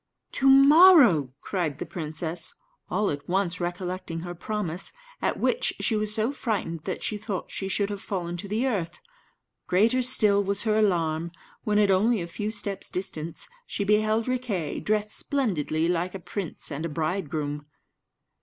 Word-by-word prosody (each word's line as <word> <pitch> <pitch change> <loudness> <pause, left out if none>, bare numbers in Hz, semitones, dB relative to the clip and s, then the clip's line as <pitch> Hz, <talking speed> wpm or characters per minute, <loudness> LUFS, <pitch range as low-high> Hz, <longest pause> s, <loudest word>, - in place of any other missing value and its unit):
"To 270 - +1
morrow!" 275 - +7
cried 170 -8 -2
the - - -5
princess, 160 0 -4 0.3
all 210 -1 +1
at 145 +1 -6
once 180 -1 0
recollecting 175 -1 -4
her 175 0 -6
promise; 180 -1 -3 0.3
at - - 0
which 475 - +1
she 225 - +1
was 215 0 0
so 220 +4 +2
frightened 195 - -3
that 185 - -4
she 210 - -2
thought 205 -3 -5
she 195 - -3
should 200 +1 0
have 200 -1 -5
fallen 175 -3 -3
to 200 - -6
the 220 +6 0
earth. 180 -9 -2 0.7
Greater 225 +8 +3
still 210 -5 +4
was 200 0 -1
her 215 -2 +1
alarm 170 -6 +1 0.3
when, 210 -1 +2
at 205 -2 +4
only 215 +4 +3
a 170 - -4
few 210 +5 -4
steps' 205 -2 -4
distance, 170 -3 -4 0.2
she 205 - -2
beheld 215 +2 +2
Riquet, 235 - -2
dressed 210 0 0
splendidly 165 - 0
like 180 +1 -1
a - - -5
prince 180 -3 -5
and 145 +2 -4
a 165 - -2
bridegroom. 150 -2 -3
195 Hz, 165 wpm, -26 LUFS, 170-215 Hz, 0.7 s, morrow